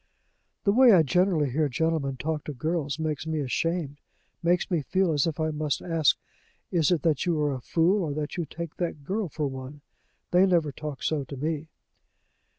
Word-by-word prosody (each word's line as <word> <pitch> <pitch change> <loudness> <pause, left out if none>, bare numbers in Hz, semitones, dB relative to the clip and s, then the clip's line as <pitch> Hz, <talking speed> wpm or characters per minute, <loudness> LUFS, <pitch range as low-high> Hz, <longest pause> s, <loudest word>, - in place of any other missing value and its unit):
"The 200 - +4
way 245 +1 +7
I 170 -4 +6
generally 170 -3 +2
hear 150 +2 +1
gentlemen 140 -1 0
talk 155 +2 -2
to 150 - -4
girls 155 +1 -2
makes 155 -1 -3
me 160 -1 -1
ashamed 150 +2 -1 0.4
makes 175 +2 +1
me 170 -3 +2
feel 185 +5 +1
as 145 +1 +2
if 160 -2 -3
I 155 0 0
must 150 -2 -1
ask, 165 -4 +2 0.5
'Is 165 -5 +3
it 170 -5 +1
that 160 0 +1
you 165 -3 +1
are 145 -1 +1
a 130 - -5
fool, 175 - +2
or 145 - -3
that 150 0 -3
you 175 -3 -2
take 165 +1 -7
that 165 -5 -3
girl 195 +4 -2
for 150 +1 -3
one?' 135 +1 -6 0.5
They 180 +2 +5
never 170 -5 +2
talk 150 0 -7
so 155 -3 0
to 140 +1 -8
me." 155 +2 -2
155 Hz, 195 wpm, -27 LUFS, 145-170 Hz, 0.5 s, way